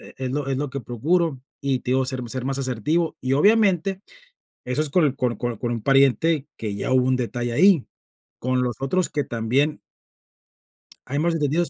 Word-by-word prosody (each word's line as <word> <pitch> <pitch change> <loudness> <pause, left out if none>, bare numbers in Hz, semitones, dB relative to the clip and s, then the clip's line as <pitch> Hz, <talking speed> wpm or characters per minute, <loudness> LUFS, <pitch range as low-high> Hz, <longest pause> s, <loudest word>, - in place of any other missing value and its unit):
e - - -13
es 130 -1 -3
lo 140 +1 -2
es 135 - 0
lo 145 -2 -3
que 140 - -4
procuro, 150 +5 0 0.2
y 135 -2 0
te - - -5
digo, 130 0 +2
ser 130 -1 -1
ser 130 +1 -3
más 135 0 -1
asertivo, 135 +6 -1
y 130 +1 0
obviamente, 195 +1 +3 0.6
eso 125 +4 0
es 155 - -2
con 155 -4 +3
con 125 -3 -1
con 120 -2 -3
un 115 - -4
pariente 140 +3 +3
que 105 -3 -4
ya 105 - -2
hubo 130 -1 +3
un 130 0 +2
detalle 120 -1 -2
ahí, 175 +2 +4 0.5
con 130 0 0
los 120 -3 -2
otros 175 +7 +1
que 145 - -1
también 130 +7 0 1.2
hay 140 +3 -2
más 170 +2 +1
entendidos 160 +2 +1
135 Hz, 190 wpm, -23 LUFS, 125-155 Hz, 1.2 s, ahí